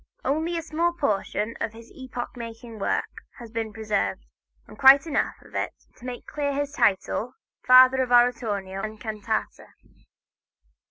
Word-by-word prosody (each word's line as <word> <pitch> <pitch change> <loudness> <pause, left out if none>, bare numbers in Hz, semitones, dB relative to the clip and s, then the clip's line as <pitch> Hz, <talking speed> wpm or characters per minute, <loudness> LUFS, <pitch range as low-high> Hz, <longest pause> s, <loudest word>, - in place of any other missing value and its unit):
Only 320 +4 0
a 330 - -3
small 335 +2 0
portion 215 - -1
of 220 - -2
his 230 +1 -14
epoch 255 -2 -7
making 230 -1 -9
work - - -2 0.2
has 235 -3 -11
been 225 -1 -3
preserved, 215 -2 -2 0.4
but - - -15
quite 275 +2 +8
enough 320 - -1
to - - -3 0.4
make 250 -1 -6
clear 285 -1 -2
his 285 0 -2
title 240 0 0 0.3
"Father 255 +1 +8
of 250 -1 -2
Oratorio 215 -6 +2
and 215 +1 -6
Cantata." 215 0 -4
240 Hz, 140 wpm, -25 LUFS, 220-275 Hz, 0.4 s, quite